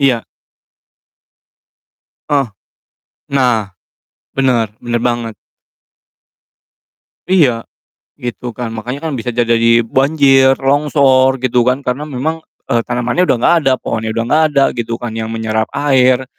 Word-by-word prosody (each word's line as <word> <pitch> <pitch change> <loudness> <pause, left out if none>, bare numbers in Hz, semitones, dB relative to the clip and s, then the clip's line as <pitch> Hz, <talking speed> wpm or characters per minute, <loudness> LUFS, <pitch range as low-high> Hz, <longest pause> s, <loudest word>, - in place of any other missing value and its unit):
iya. 130 -5 +2 2.1
Ah! 135 -8 0 0.7
Nah, 120 -8 0 0.6
benar 120 -6 +1
benar 120 -1 -2
banget. 120 -2 -2 2.0
Iya, 135 -11 +3 0.6
gitu, 120 0 -5
kan. 115 -2 -4
Makanya 125 +5 -5
kan - - -4
bisa 125 -1 -4
aja 120 0 0
jadi 115 0 +2 0.2
banjir, 135 +1 +3
longsor 135 -2 +3
gitu 125 -1 +1
kan, 125 +3 0
karena 125 +3 -2
memang, 155 +5 -3 0.2
eee, 115 - +1
tanamannya 125 +9 -1
udah - - +4
enggak 120 +8 +3
ada, 135 - +2
pohonnya 110 -1 -3
udah 115 +1 -1
enggak 155 +6 +2
ada, 140 -2 +2
gitu 115 -1 -3
kan, 120 -2 -6
yang 110 0 -4
menyerap 110 -1 -2
air, 130 -2 +2
125 Hz, 125 wpm, -15 LUFS, 115-135 Hz, 2.1 s, udah